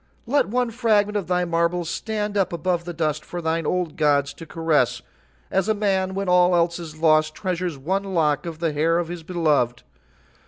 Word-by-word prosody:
"Let 285 +4 +2
one 245 +2 0
fragment 210 -3 +2
of 200 -4 -1
thy 180 0 +1
marbles 170 0 0
stand 210 +3 -3
up 195 -2 +1
above 170 0 -1
the 175 - -4
dust 155 -2 -1
for 175 - -6
thine 165 -1 -1
old 180 -4 -1
gods 145 -2 +2
to 165 - -11
caress, 160 -7 +1 0.5
as 190 +2 +1
a 220 - +3
man 190 -2 0
when 195 0 -2
all 180 0 +4
else 170 0 +1
is 160 -2 -8
lost 155 -1 +3
treasures 180 -4 -3
one 190 +9 -2
lock 150 0 +1
of 165 -2 -6
the 165 -2 -1
hair 160 +3 +2
of 170 -1 -2
his 175 -1 -6
beloved. 155 -8 0
170 Hz, 195 wpm, -23 LUFS, 160-190 Hz, 0.5 s, all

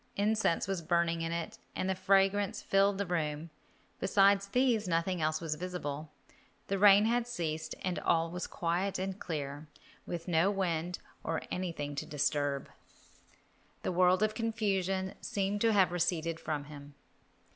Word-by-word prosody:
Incense 210 -4 +1
was 195 -3 -2
burning 170 0 +1
in 165 0 -2
it, 170 -1 -4 0.2
and 185 - -1
the 190 - +2
fragrance 195 +1 +2
filled 195 0 +2
the 200 - -1
room. 160 -2 -2 0.5
Beside 195 +1 +4
these, 245 -4 +2
nothing 170 +1 0
else 155 0 +1
was 165 -2 -2
visible. 155 -3 -5 0.6
The 195 0 0
rain 205 +1 +7
had 235 +1 +1
ceased 160 -8 -3
and 185 -1 -1
all 165 0 +1
was 180 +1 -4
quiet 175 +3 -1
and 190 +1 -3
clear, 145 -2 -5 0.4
with 170 0 -5
no 170 +2 +3
wind 180 -3 -1 0.3
nor 160 0 -2
anything 165 -6 -3
to - - -3
disturb. 145 -1 0 1.2
The - - 0
world 180 +2 +4
of 215 0 +1
confusion 195 -4 -1
seemed 200 +1 -1
to 230 - +4
have 190 -5 +4
receded 165 -2 0
from 150 -2 -3
him. 145 -1 -11
180 Hz, 150 wpm, -32 LUFS, 160-195 Hz, 1.2 s, rain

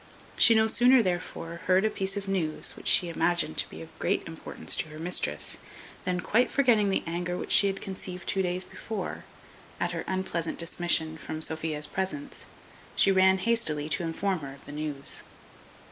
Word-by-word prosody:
She 230 - +7
no 220 0 +4
sooner 245 +3 +5
therefore 175 -2 -4
heard 185 +3 +4
a - - +3
piece 195 +1 -1
of 200 -1 -5
news, 175 -6 +1
which - - -9
she 175 - +5
imagined 170 - 0
to - - 0
be - - -9
of - - -16
great - - 0
importance 80 - -1
to 155 - -2
her 155 - -10
mistress, 175 +3 0 0.5
than, 180 0 -1
quite 240 +6 +2
forgetting 230 -7 +3
the 190 - 0
anger 175 +1 -3
which - - -5
she 200 - +7
had 195 0 -3
conceived 185 -1 -6
two 195 - +1
days 180 0 -1
before, 210 -1 -6 0.5
at - - 0
her - - -4
unpleasant 185 -3 -2
dismission 165 -2 +1
from 155 +3 -6
Sophia's 155 -1 -1
presence, 230 +10 -4 0.5
she 195 - +4
ran 190 0 +5
hastily 190 -9 0
to 175 - +1
inform 180 +3 -1
her 140 -2 -8
of 140 - -18
the - - -9
news. 145 -2 -2
180 Hz, 180 wpm, -28 LUFS, 160-195 Hz, 0.5 s, She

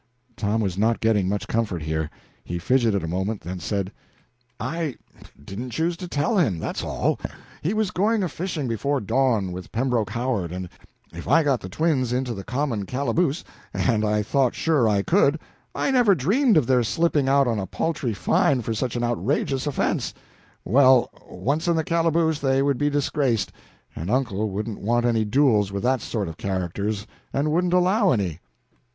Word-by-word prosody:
Tom 110 +1 0
was 95 -3 -2
not 115 +2 +2
getting 105 -4 +2
much 105 +1 -2
comfort 105 -8 -1
here. 80 0 -2 0.3
He 85 - -4
fidgeted 110 0 +1
a - - -3
moment, 95 +5 -2
then 90 +2 -6
said: 100 +2 -2 0.7
"I 165 -5 -3 0.5
didn't 115 +9 -6
choose 165 +8 -1
to 180 - -6
tell 165 +7 +1
him 110 - +2
that's 80 - -4
all. - - -1 0.4
He 180 +8 -1
was 215 -3 0
going 210 +3 +1
a - - +1
fishing 165 -5 -3
before 135 +5 0
dawn, 115 -4 +1
with 90 +1 -8
Pembroke 120 -4 0
Howard, 115 -7 -2
and 90 0 -5 0.4
if 85 - -8
I 165 - +5
got 140 -4 +2
the 95 - -7
twins 135 - 0
into 125 -1 -1
the 100 -3 -7
common 125 -6 -2
calaboose 140 +4 0 0.3
and 110 -4 +1
I 105 0 +1
thought 130 +3 +1
sure 145 -9 +2
I 100 -2 +2
could 160 - +3 0.4
I - - 0
never 245 -7 +5
dreamed 210 - +3
of 150 - +4
their 125 0 +3
slipping 150 +2 +1
out 140 -1 +4
on 115 -3 0
a 95 - -3
paltry 145 -9 -2
fine 120 +7 +2
for 115 - -2
such 125 +2 -2
an 120 - -1
outrageous 130 - 0
offense 145 - -1 0.5
well, 130 +2 +5 0.2
once 150 +6 -2
in 170 - +3
the 160 - +1
calaboose 165 -2 +1
they 135 -1 +2
would 140 -2 +1
be 145 0 +2
disgraced, 135 -7 0 0.4
and 80 +5 -5
uncle 110 -4 0
wouldn't 105 +2 -4
want 120 +3 +1
any 115 -2 +2
duels 105 -4 +3
with 100 0 -4
that 130 -1 +2
sort 105 -4 -3
of 80 0 -7
characters, 100 +2 -2 0.3
and 145 +2 0
wouldn't 175 +2 +1
allow 185 +2 +3
any." 90 -8 -1
125 Hz, 180 wpm, -24 LUFS, 105-150 Hz, 0.7 s, I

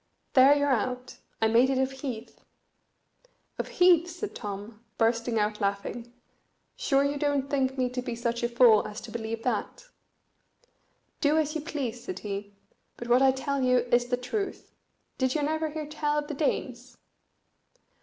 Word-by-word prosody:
"There 270 +1 +7
you're 285 0 +1
out. 250 +1 -2 0.3
I - - +5
made 235 +4 +4
it 270 - +1
of 265 0 +1
heath." 260 -4 -7 1.2
"Of - - -2
heath!" 355 -1 +5
said 355 +5 -6
Tom, 210 +1 -7
bursting 230 0 +1
out 210 0 0
laughing; 200 +4 -3 0.6
"sure 275 -1 +2
you 285 +1 0
don't 285 -1 0
think 265 -1 0
me 255 -1 +1
to 250 0 -3
be 240 -1 -4
such 235 0 -2
a 240 - 0
fool 235 -3 +5
as 210 +1 -7
to 230 - -10
believe 225 0 -4
that?" 255 - -2 1.3
"Do 300 +1 +3
as 305 -1 +1
you 315 - -3
please," 260 -6 -4
said 185 - -5
he, 200 0 -6 0.4
"but 240 - -7
what 245 +2 +5
I 270 - +6
tell 270 +1 -2
you 250 -1 +4
is 240 0 +3
the 245 0 0
truth. 390 - -4 0.5
Did 260 +1 +1
you 300 - 0
never 315 +1 0
hear 305 0 -5
tell 300 0 -1
of 295 0 -2
the 300 - -4
Danes?" 255 -4 -2
255 Hz, 170 wpm, -28 LUFS, 230-285 Hz, 1.3 s, There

